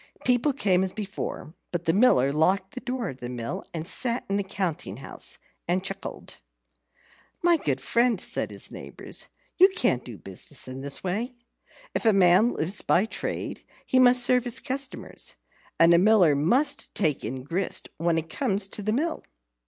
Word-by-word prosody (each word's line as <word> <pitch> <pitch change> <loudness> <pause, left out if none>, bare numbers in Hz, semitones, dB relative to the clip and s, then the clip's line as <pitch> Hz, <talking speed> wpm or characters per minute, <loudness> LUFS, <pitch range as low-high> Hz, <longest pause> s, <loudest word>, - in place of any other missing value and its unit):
People 250 +4 +3
came 190 -9 +2
as 190 - -2
before; 200 -6 -5 0.2
but 175 -1 -3
the 165 - +3
Miller 140 - +4
locked 185 +5 +1
the - - -5
door 250 -1 -3
of 130 - -8
the 120 -2 -7
mill 125 +10 -5
and 165 -1 -4
sat 240 +3 +3
in 195 - 0
the 200 - 0
counting 180 - -3
house 135 - -3 0.3
and 180 +2 +1
chuckled. 195 0 -6 1.1
"My 345 -1 +5
good 140 - -1
friend," 235 - +2
said - - -2
his - - -3
neighbours, - - -6 0.3
"you 375 +2 +8
can't 255 - +1
do 120 -4 -9
business 95 +11 -5
in 130 +1 -7
this 140 0 -3
way. 220 +8 -2 0.6
If - - -2
a 220 - +6
man 190 +4 +5
lives 180 +6 -1
by 185 - +3
trade, 225 - -4 0.2
he 260 - +2
must 250 -1 +7
serve 250 0 +3
his 245 +1 -1
customers. 275 -1 -5 0.4
And 165 +1 +7
a 170 - +6
Miller 190 -6 +5
must 250 - +1
take 155 -8 +1
in 130 0 -4
grist 175 +7 -2
when 165 0 +1
it 165 0 -2
comes 195 +4 0
to 210 - -4
the 215 +1 0
mill." 315 +7 -1
195 Hz, 175 wpm, -26 LUFS, 160-245 Hz, 1.1 s, you